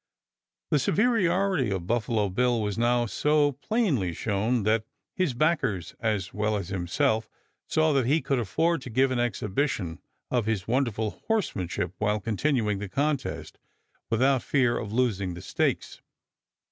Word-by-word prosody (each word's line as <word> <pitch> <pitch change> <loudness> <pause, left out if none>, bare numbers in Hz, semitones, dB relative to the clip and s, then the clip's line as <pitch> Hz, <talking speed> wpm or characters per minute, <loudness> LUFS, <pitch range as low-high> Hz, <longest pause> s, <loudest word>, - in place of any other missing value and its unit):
The 150 - +4
superiority 190 - +2
of 95 -3 -2
Buffalo 110 -1 0
Bill 120 +4 +1
was 105 -2 -1
now 120 +1 +2
so 150 +5 +2
plainly 145 - 0
shown 110 +5 0
that 110 +1 +2 0.3
his 180 -9 0
backers, 135 - 0
as 105 -5 -1
well 105 +1 0
as 95 -3 -5
himself, 100 +4 0 0.4
saw 155 -1 +2
that 135 -4 +2
he 150 +5 +3
could 135 -2 0
afford 160 - +1
to 130 - -8
give 130 +3 +2
an 125 - 0
exhibition 105 - -1 0.3
of 120 -4 +1
his 105 -5 -1
wonderful 115 -4 -1
horsemanship, 95 - -1
while 105 0 +1
continuing 110 -1 0
the 100 -1 -5
contest, 140 +3 -2 0.5
without 130 +3 +3
fear 125 -3 +2
of 105 -3 -4
losing 105 -7 0
the 85 - -8
stakes. - - -1
120 Hz, 145 wpm, -27 LUFS, 105-140 Hz, 0.5 s, The